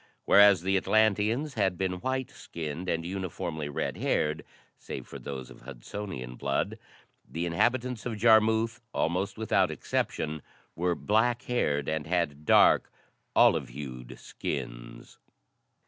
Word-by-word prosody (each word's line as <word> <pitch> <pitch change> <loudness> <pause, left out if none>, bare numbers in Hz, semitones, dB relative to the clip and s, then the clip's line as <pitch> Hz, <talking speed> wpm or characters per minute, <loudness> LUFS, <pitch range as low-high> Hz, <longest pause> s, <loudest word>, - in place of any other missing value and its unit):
Whereas 100 -3 +6
the 95 +1 +2
Atlanteans 110 +8 +2
had 95 -5 0
been 90 -1 -2
white 130 +2 -2
skinned 85 - -6
and 85 0 -1
uniformly 85 -4 -4
red 70 - -3
haired 75 0 0 0.4
save - - -7
for - - -9
those 65 -2 -7
of - - -14
Hudsonian 65 0 -7
blood - - -1 0.5
the 85 +2 -3
inhabitants 120 +7 0
of 115 -3 -4
Jarmuth 110 +1 +4
almost 90 +6 -1
without 100 -4 +2
exception 80 0 -2 0.3
were 90 +1 0
black 120 +6 +1
haired 75 - 0
and 80 -1 -2
had 80 -4 -1
dark, - - +5 0.4
olive 65 - +4
hued 65 -2 -8
skins. - - -6
90 Hz, 125 wpm, -28 LUFS, 75-110 Hz, 0.5 s, Whereas